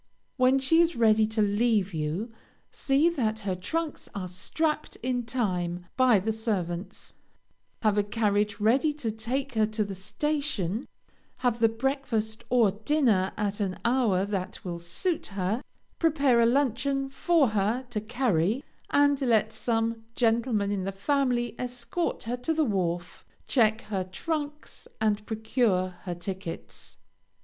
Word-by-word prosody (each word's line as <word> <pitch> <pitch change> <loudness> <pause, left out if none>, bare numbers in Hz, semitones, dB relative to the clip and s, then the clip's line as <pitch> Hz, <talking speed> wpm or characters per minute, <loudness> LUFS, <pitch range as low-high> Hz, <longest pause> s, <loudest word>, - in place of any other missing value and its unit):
When 255 +1 +5
she 300 +5 +4
is 340 -1 +2
ready 220 -2 +4
to 220 -1 +1
leave 205 -2 +2
you, 160 +9 -2 0.4
see 280 +3 +2
that 225 -10 0
her 195 -2 -1
trunks 315 - -3
are 190 -2 -3
strapped 300 - -2
in 245 -2 -1
time 180 -8 -1
by 255 -4 +5
the 215 +4 -1
servants, 190 -5 -3 0.7
have 210 -1 +3
a - - +3
carriage 205 -1 0
ready 255 +8 +3
to 255 -7 -3
take 250 +5 -3
her 215 -1 +3
to 215 0 -1
the 200 -1 -5
station, 215 - -2 0.6
have 240 -1 +2
the 225 -1 +5
breakfast 230 -2 -2
or 235 -5 +4
dinner 215 -3 +2
at 205 0 -1
an 190 -3 -1
hour 235 -6 +3
that 190 -2 -4
will 170 -1 -4
suit 235 - -2
her, 200 +4 -2 0.4
prepare 285 -7 +3
a 230 - +5
luncheon 275 +1 +1
for 285 0 +2
her 215 +5 0
to 215 -3 -2
carry, 220 - 0 0.3
and 285 -1 +3
let 225 -4 +2
some 225 -1 -1
gentleman 225 -3 +1
in 195 -2 -1
the 195 - -2
family 240 +2 0
escort 250 +8 -3
her 240 +2 -2
to 285 +6 -1
the 315 -1 +3
wharf, 175 -5 -2 0.2
check 220 -3 +3
her 195 -3 -3
trunks, 295 - -5
and 215 -1 +1
procure 220 -4 +1 0.2
her 175 -2 -3
tickets. 185 0 -7
225 Hz, 145 wpm, -28 LUFS, 200-260 Hz, 0.7 s, When